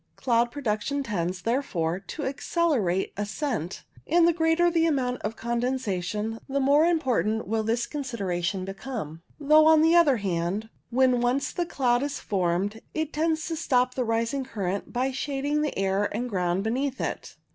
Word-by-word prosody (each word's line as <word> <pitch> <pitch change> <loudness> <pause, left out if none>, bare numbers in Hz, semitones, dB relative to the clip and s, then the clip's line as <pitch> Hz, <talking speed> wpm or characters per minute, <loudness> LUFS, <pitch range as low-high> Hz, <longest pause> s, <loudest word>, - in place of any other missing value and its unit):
Cloud 240 -2 +2
production 275 +2 -2
tends, 185 -5 -3
therefore, 185 -9 -1
to 290 +9 -7
accelerate 265 - 0
ascent, 205 - -3 0.2
and 340 +2 +5
the 340 - +4
greater 325 +1 +3
the 330 -1 +3
amount 255 -5 0
of 215 +2 -3
condensation, 225 -3 -2
the 280 +1 0
more 285 +3 +4
important 250 - +1
will 220 +2 0
this 230 +2 0
consideration 195 - -3
become; 195 - -6 0.2
though, 305 +2 +6
on 315 -1 +6
the 325 +1 +5
other 305 -7 +5
hand, 195 +2 -2 0.2
when 255 0 +3
once 245 +3 +1
the 350 -1 -2
cloud 245 -5 +1
is 285 0 -3
formed, 195 +2 -1
it 315 -1 -2
tends 315 +1 0
to 330 - -2
stop 255 -6 +1
the 255 - -1
rising 230 +4 0
current 200 -5 -4
by 255 +2 0
shading 285 +2 -1
the 300 - -2
air 195 +1 +1
and 240 +3 -3
ground 180 0 0
beneath 260 +4 -1
it. - - -4
245 Hz, 160 wpm, -26 LUFS, 205-285 Hz, 0.2 s, though